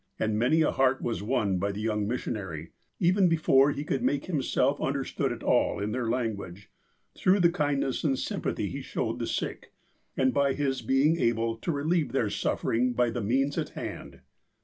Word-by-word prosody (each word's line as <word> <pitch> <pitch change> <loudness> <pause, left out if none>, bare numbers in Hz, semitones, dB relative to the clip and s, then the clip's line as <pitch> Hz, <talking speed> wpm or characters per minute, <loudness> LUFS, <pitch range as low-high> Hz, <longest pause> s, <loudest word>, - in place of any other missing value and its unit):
And 110 -1 0
many 140 +8 +3
a - - +2
heart 130 0 +2
was 115 -3 -2
won 105 -4 0
by 100 +2 0
the 100 - -6
young 105 -2 -1
missionary, 95 -9 -4 0.3
even 185 +1 +4
before 145 -4 +4
he 145 0 -3
could 140 -3 -2
make 145 0 0
himself 145 -3 0
understood 135 0 -1
at - - -6
all - - +2
in 105 +1 -2
their 120 0 -2
language, 100 -6 -3 0.4
through 190 +2 +3
the 170 -2 +5
kindness 145 -5 -1
and 140 -4 +2
symj)athy - - -3
he - - -5
showed - - -3
the - - -2
sick, - - -4 0.4
and 130 -1 +2
by 140 -1 +2
his 135 -3 -1
being 135 +7 +2
able 115 0 +1
to 170 - -2
relieve 155 +1 0
their 115 -6 +1
suffering 120 +4 0
by 120 -1 +1
the 120 - -3
means 135 +7 +1
at - - -3
hand. - - -7
130 Hz, 185 wpm, -28 LUFS, 115-145 Hz, 0.4 s, the